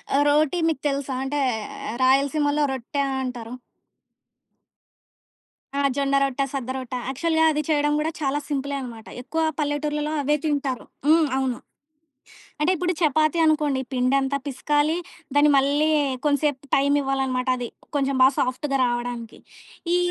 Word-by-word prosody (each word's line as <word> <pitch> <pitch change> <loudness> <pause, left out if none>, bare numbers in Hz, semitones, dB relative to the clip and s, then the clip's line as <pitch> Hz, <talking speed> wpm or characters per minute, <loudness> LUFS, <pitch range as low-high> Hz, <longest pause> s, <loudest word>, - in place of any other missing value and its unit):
ఆహ్, 290 - +4
రోటి 305 +3 +3
మీకు 310 -4 -1
తెలుసా? 275 -1 -3
అంటే 290 +2 -2 0.6
'రాయలసీమలో' 290 +3 +3
రొట్టె 265 +3 -3 0.2
అంటారు. 245 -2 -6 2.2
ఆ! 280 - -1 0.2
జొన్న 275 0 +1
రొట్ట, 275 0 -1
సద్దరొట్టా. 260 -1 -4
యాక్చువల్‌గా 320 +4 +1
అది 300 - 0
చేయడం 295 -1 +2
కూడా 310 +2 -1
చాలా 285 0 0
సింపులే 280 -1 -2
అనమాట. 230 -3 -9
ఎక్కువ 320 +6 -2 0.2
పల్లెటూర్లలో 295 +1 -1
అవే 295 +2 +2
తింటారు. 280 -4 -1 0.2
హ్మ్. 320 0 +5
అవును. 260 -2 -1 1.0
అంటే 305 +4 +3
ఇప్పుడు 360 +2 0
చపాతీ 310 +1 +2
అనుకోండి 300 -4 +2
పిండంత 265 +2 +1
పిసకాలి, 295 +3 +1 0.4
దాన్ని 290 +1 +5
మళ్ళీ 285 +3 +2 0.4
కొంచెంసేపు 290 -2 0
టైం 280 +1 +2
ఇవ్వాలన్నమాట 265 -2 -1
అది. 240 -1 -4 0.3
కొంచెం 275 -1 +1
బాగా 265 +1 +6
సాఫ్ట్‌గా 275 +2 -1
రావడానికి. 240 -1 -4 0.6
ఈ - - +5
280 Hz, 125 wpm, -24 LUFS, 260-300 Hz, 2.2 s, బాగా